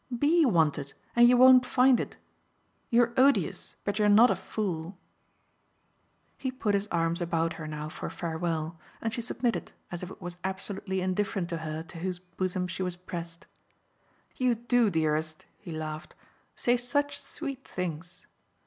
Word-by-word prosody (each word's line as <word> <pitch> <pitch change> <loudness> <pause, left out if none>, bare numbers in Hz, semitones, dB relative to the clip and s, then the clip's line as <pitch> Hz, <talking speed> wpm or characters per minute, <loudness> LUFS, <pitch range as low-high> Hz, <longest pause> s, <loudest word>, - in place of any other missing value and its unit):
"BE 310 +4 +4
wanted, 150 - +1 0.2
and 240 0 +7
you 250 - +5
won't 255 0 +8
find 250 0 +4
it. - - -5 0.7
You're 235 0 +3
odious, 275 +2 +2
but 205 +1 -2
you're 210 0 +4
not 220 +4 +7
a - - +2
fool." 180 -4 -4 1.4
He 265 - -2
put 230 -5 -1
his 200 +1 0
arms 170 -1 0
about 165 -1 0
her 160 -1 -7
now 150 0 -5
for 155 - -6
farewell, 165 -1 -3 0.2
and 225 -1 -2
she 235 - -2
submitted 235 0 -1 0.2
as 175 - -5
if 180 - -6
it - - -11
was 175 -1 -7
absolutely 190 0 -3
indifferent 185 -1 -1
to 170 - -2
her 155 0 -4
to 165 0 -11
whose 180 +1 -2
bosom 180 +1 -3
she 185 +1 -5
was 180 -1 -1
pressed. 170 -1 -7 0.9
"You 250 -2 +2
do, 240 0 +2
dearest," 155 -2 -1
he 175 - -9
laughed, 155 0 -6 0.4
"say 245 0 +2
such 285 +4 -1
sweet 275 -1 -5
things!" 175 -1 -6
185 Hz, 160 wpm, -29 LUFS, 165-240 Hz, 1.4 s, won't